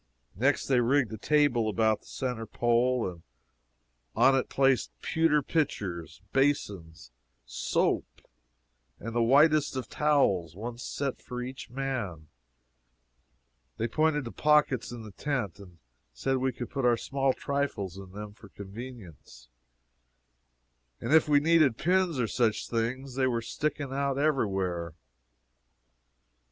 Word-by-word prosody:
Next, 135 +8 +1
they 130 -2 +3
rigged 120 -1 +2
a - - -5
table 145 -5 +2
about 110 0 +2
the - - -22
centre 125 -4 -4
pole, 120 +1 +1
and 85 -2 -8 0.9
on 135 - +5
it 135 - 0
placed 135 - +2
pewter 160 -2 +2
pitchers, 100 - -2
basins, 100 - -1 0.3
soap, - - 0 0.9
and 115 +1 -6
the 120 - +1
whitest 145 +5 +4
of 130 - -4
towels 100 - +1
one 115 +4 -6
set 135 +1 -4
for 125 - -6
each 130 +1 -8
man; 120 - -4 1.5
they - - -1
pointed 150 +2 +1
to 115 - -6
pockets 150 -6 +2
in 120 -2 -7
the 110 - -10
tent, 120 - -3
and 90 -4 -14 0.4
said 135 - -1
we 130 0 0
could 120 -1 -7
put 135 -2 -2
our 120 -1 +4
small 135 +2 0
trifles 130 -10 -2
in 95 -1 -10
them 105 +1 -8
for 105 -1 -16
convenience, 100 - -11 1.5
and - - -1
if 160 -1 +5
we 145 -1 +6
needed 155 -6 +4
pins 180 -3 +1
or 120 - +2
such 110 -1 0
things, 125 +3 -2
they 130 0 +1
were 120 -2 0
sticking 140 +3 -3
every 140 -2 +1
where. 90 -4 -3
125 Hz, 135 wpm, -29 LUFS, 105-140 Hz, 1.5 s, we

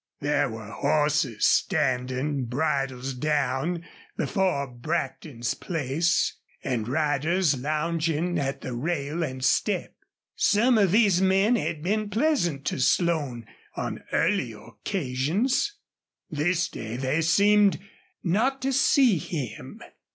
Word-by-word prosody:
There 145 -2 +1
were 110 -2 -8
horses 150 -7 +1
standing, 130 -3 +1
bridles 135 0 -1
down, 150 +4 -1 0.3
before 185 -9 0
Brackton's 125 -2 -3
place, 160 +1 0 0.3
and 120 -5 -2
riders 155 +3 +1
lounging 160 +3 -1
at 135 -1 -2
the 130 - -5
rail 150 +4 -2
and 130 -5 -3
step. - - +1 0.4
Some 225 +3 +3
of 195 -4 +3
these 200 -4 +4
men 195 +5 +3
had 155 -9 -2
been 210 +3 0
pleasant 205 - 0
to - - -2
Slone 145 -6 +1 0.3
on - - -4
earlier 130 - 0
occasions. 170 - -1 0.6
This 165 +3 +1
day 110 +1 -6
they 135 +5 0
seemed 200 +5 +4 0.5
not 230 +10 +1
to 270 0 0
see 255 - +4
him. 150 -5 -6
155 Hz, 110 wpm, -26 LUFS, 130-185 Hz, 0.6 s, these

